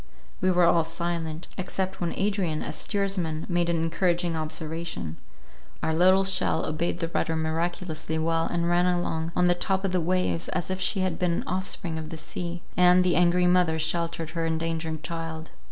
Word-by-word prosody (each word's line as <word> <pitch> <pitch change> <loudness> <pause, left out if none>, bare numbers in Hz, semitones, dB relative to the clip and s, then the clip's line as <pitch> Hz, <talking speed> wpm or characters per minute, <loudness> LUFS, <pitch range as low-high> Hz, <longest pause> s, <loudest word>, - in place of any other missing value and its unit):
We 185 - +3
were 180 -1 +4
all 170 -1 +4
silent, 165 0 -3
except 190 +1 -3
when 170 - -1
Adrian, 195 -6 0
as - - -4
steersman, 185 -5 -1
made 175 -2 +1
an 170 - +2
encouraging 170 +1 0
observation. 155 - -4 0.7
Our 160 - +1
little 185 +4 +5
shell 190 0 +2
obeyed 165 +2 -1
the 165 - -2
rudder 165 -1 0
miraculously 160 0 -2
well, 165 +1 +1
and 170 -1 -1
ran 175 +1 +3
along 170 -2 -1
on 180 - +3
the 175 - +5
top 190 +2 -1
of 195 - 0
the 180 -1 +1
waves, 180 0 0
as 175 - -2
if 185 0 -2
she 190 +1 +1
had 185 -3 -1
been 180 -2 +2
an - - -1
offspring 180 -3 -2
of 155 -1 -6
the 160 - -6
sea, 175 +2 -5
and 180 0 +6
the 180 -1 +2
angry 180 0 +4
mother 180 -3 +3
sheltered 165 0 -1
her 165 0 -2
endangered 160 -1 -2
child. 165 -1 -5
170 Hz, 185 wpm, -26 LUFS, 160-180 Hz, 0.7 s, and